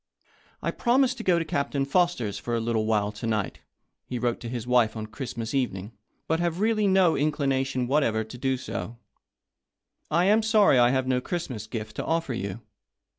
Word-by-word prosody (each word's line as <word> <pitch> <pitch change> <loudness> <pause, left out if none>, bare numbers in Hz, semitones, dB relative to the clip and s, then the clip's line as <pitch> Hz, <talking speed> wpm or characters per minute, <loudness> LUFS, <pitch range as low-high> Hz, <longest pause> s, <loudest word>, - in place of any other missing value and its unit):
" - - -33
I - - 0
promised 255 +1 +2
to 230 - -6
go 180 -4 +3
to 165 - -1
Captain 140 -2 -1
Foster's 140 - +1
for 120 - -2
a - - +1
little 110 -1 0
while 105 -2 +1
to 105 +2 -6
night," 110 -4 -1 0.5
he 125 - -3
wrote 120 0 -1
to 120 - -6
his 120 -2 -4
wife 120 -3 +2
on 110 - -4
Christ 125 +3 -7
mas 115 +1 -4
evening, 110 -7 -2 0.2
" - - -47
but 160 +1 +1
have 170 0 -1
really 215 -1 +2
no 190 -3 +4
inclination 135 -3 0
what 145 +5 +2
ever 110 -4 +1
to 110 +3 -10
do 130 0 0
so. 120 -2 -6 1.1
I 170 +3 +3
am 210 +3 +4
sorry 215 - +4
I 120 0 +6
have 130 0 +1
no 130 -1 +1
Christmas 125 - -4
gift 110 -1 -6
to - - -2
offer 165 -5 -1
you. 100 -2 -4
130 Hz, 205 wpm, -26 LUFS, 115-165 Hz, 1.1 s, I